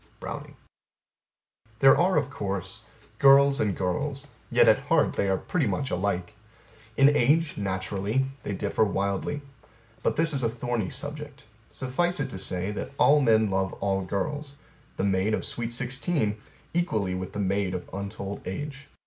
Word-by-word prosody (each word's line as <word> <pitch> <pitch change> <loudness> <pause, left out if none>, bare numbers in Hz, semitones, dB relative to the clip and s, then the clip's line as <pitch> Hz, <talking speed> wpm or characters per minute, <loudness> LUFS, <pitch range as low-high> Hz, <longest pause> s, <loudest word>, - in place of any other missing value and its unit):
Browning - - -7 1.2
There 135 +3 +7
are 185 +2 +3
of 135 - 0
course, 100 -3 -4 0.4
girls 140 0 +6
and 105 -3 0
girls; 135 +10 -2 0.2
yet - - +5
at - - +6
heart - - +3
they 100 - 0
are 95 - +2
pretty 160 - -1
much 140 -2 -2
alike. 90 -1 -1 0.6
In 140 +2 +6
age, 150 +5 +3
naturally, 100 +5 -1 0.2
they 100 - -4
differ 100 +3 0
wildly. 100 +8 -1 0.6
But - - +1
this 165 0 +2
is 135 - 0
a 115 - +1
thorny 115 -3 -2
subject. 145 -1 -5 0.3
Suffice 175 +8 -1
it 135 -2 -2
to 95 - -6
say 95 +1 -1
that 105 - -5
all 150 +1 +5
men 110 -5 +3
love 95 0 0
all 95 -1 -1
girls 140 - -3 0.4
the - - -1
maid 100 +2 +2
of - - -4
sweet 120 -1 -3
sixteen 125 -3 -1 0.3
equally 110 - 0
with 90 0 -5
the 105 - -4
maid 100 -1 0
of 90 - -5
untold 100 0 -5
age. 140 +7 -5
110 Hz, 155 wpm, -27 LUFS, 95-140 Hz, 1.2 s, There